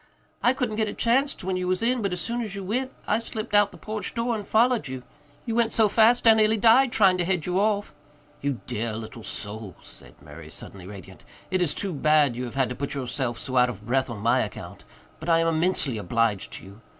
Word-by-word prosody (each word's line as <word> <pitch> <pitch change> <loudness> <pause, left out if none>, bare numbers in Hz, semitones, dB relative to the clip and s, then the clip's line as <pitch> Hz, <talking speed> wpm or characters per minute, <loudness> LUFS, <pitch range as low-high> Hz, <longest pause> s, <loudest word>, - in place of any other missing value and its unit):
I 245 - +4
couldn't 250 -5 -2
get 220 -1 +1
a - - -5
chanst 265 +3 +1
when 185 0 -1
you 180 0 -2
was 185 +3 0
in, 245 +1 +1
but 200 -2 -1
as 180 - -3
soon 235 +5 -2
as 210 -4 -5
you 200 - -5
went 255 +7 -2
I 215 - +1
slipped 225 -1 -6
out 205 0 +5
by - - -16
the - - -21
porch 215 -3 -4
door 235 +1 0
and 210 -2 -6
followed 235 - +2
you. 130 -1 -6 0.4
You 230 - -2
went 230 -1 +2
so 220 -2 +4
fast 230 +4 +4
I 225 - +9
near 220 0 +3
died 235 +4 +5
trying 190 -5 +4
to - - +2
head 175 -3 -1
you 180 +1 0
off." 205 0 0 0.5
"You 140 -6 -2
dear 110 0 -3
little 115 +2 -8
soul," 105 -3 -6
said - - -12
Murray, 75 +1 -12
suddenly 90 +3 -10
radiant. 95 -2 -11 0.3
"It 185 -1 +1
is 165 -4 0
too 195 -3 -3
bad 150 -3 +3
you 125 +1 -4
have 120 - -8
had 135 -2 +1
to 125 - -5
put 140 +2 -4
yourself 130 -2 -3
so 130 -1 -2
out 125 0 +5
of 105 -3 -8
breath 130 +3 0
on 115 - -5
my 120 +4 +3
account. 105 - -6 0.3
But 160 - -5
I 165 - +5
am 165 - +2
immensely 160 -7 +1
obliged 105 +1 0
to - - -8
you. 100 +3 -14
180 Hz, 245 wpm, -25 LUFS, -, 0.5 s, I